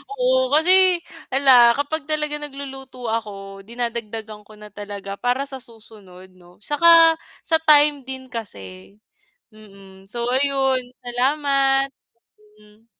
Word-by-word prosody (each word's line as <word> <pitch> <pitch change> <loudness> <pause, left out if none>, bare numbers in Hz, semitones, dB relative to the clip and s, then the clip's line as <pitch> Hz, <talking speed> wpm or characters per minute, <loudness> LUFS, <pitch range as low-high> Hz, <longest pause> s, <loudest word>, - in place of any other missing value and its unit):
Oo - - +1
kasi, 365 +2 +4 0.3
'ala, 255 -3 +5
kapag 290 +1 -3
talaga 300 -1 -2
nagluluto 270 -4 -8
ako, 195 -3 -6
dinadagdagan 225 -3 -6
ko 215 - -15
na 210 0 -13
talaga 200 -1 -8
para 250 +3 0
sa 270 -1 -9
susunod, 210 -6 -16
'no. 180 -1 -21
Saka 330 +3 +5 0.2
sa 320 - +2
time 295 -3 +4
din 260 -1 -9
kasi. 100 - -9 0.6
Mm. 195 -2 -17
So, 235 0 -4
ayun 270 -1 +1 0.2
salamat. 270 +2 +1 0.7
Hmm. 210 +1 -23
250 Hz, 115 wpm, -21 LUFS, 210-290 Hz, 0.7 s, ala